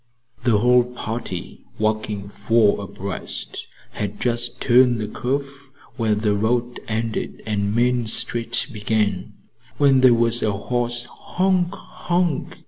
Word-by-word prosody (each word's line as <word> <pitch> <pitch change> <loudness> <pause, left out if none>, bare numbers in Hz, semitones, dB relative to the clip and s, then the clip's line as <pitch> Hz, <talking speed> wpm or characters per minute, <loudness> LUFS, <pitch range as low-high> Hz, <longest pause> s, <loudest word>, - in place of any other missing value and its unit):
The 115 -4 +4
whole 125 +2 +4
party, 115 -6 -6
walking 110 -2 -1
four 105 0 +2
abreast, 95 -1 -6 0.2
had 105 0 -4
just 120 0 0
turned 125 -1 +4
the 105 - -3
curve 140 +3 -4 0.3
where 110 -4 +1
the 105 0 +1
road 120 +4 0
ended 110 0 -3
and 105 -1 -1
Main 120 -1 +2
Street 115 +1 +1
began, 105 -3 -1 0.4
when 135 -2 +4
there 125 -2 +7
was 115 +1 +2
a 105 - +1
hoarse 120 +4 -2
honk! 180 +7 -1
honk! 175 -4 -2
115 Hz, 125 wpm, -22 LUFS, 105-125 Hz, 0.4 s, there